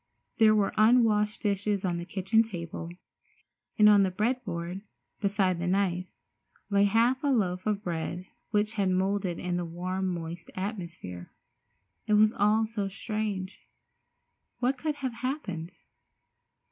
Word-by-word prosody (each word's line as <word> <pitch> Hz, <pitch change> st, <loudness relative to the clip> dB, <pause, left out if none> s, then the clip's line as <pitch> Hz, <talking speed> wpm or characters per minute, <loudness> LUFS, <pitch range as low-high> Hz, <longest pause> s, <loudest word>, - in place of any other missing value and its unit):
There 215 Hz, -1 st, +6 dB
were 205 Hz, -2 st, +1 dB
unwashed 215 Hz, -2 st, +4 dB
dishes 200 Hz, -1 st, 0 dB
on 175 Hz, -2 st, -1 dB
the 170 Hz, -, -5 dB
kitchen 195 Hz, +4 st, +2 dB
table, 170 Hz, -6 st, -5 dB, 0.9 s
and 210 Hz, -, +7 dB
on 205 Hz, -1 st, +7 dB
the 190 Hz, -, +3 dB
bread 235 Hz, +7 st, -1 dB
board, 175 Hz, +1 st, -4 dB, 0.4 s
beside 195 Hz, -3 st, +1 dB
the 175 Hz, -, -2 dB
knife, 180 Hz, -1 st, +1 dB, 0.6 s
lay 200 Hz, 0 st, +4 dB
half 235 Hz, +6 st, +2 dB
a -, -, +1 dB
loaf 190 Hz, -8 st, +1 dB
of 210 Hz, -1 st, 0 dB
bread 175 Hz, 0 st, -3 dB, 0.2 s
which 210 Hz, -1 st, +1 dB
had 200 Hz, -4 st, +1 dB
moulded 185 Hz, -1 st, 0 dB
in 180 Hz, -1 st, -2 dB
the 175 Hz, -, -1 dB
warm, 185 Hz, +3 st, -3 dB
moist 170 Hz, 0 st, -6 dB
atmosphere. 175 Hz, -, -6 dB, 0.8 s
It 210 Hz, -, +2 dB
was 215 Hz, +1 st, +5 dB
all 210 Hz, +2 st, +3 dB
very 215 Hz, -3 st, -3 dB
strange. 205 Hz, -2 st, -4 dB, 0.9 s
What 255 Hz, +2 st, +1 dB
could 300 Hz, +3 st, -2 dB
have 265 Hz, -4 st, -3 dB
happened? 230 Hz, -, -4 dB
200 Hz, 140 wpm, -28 LUFS, 180-215 Hz, 0.9 s, and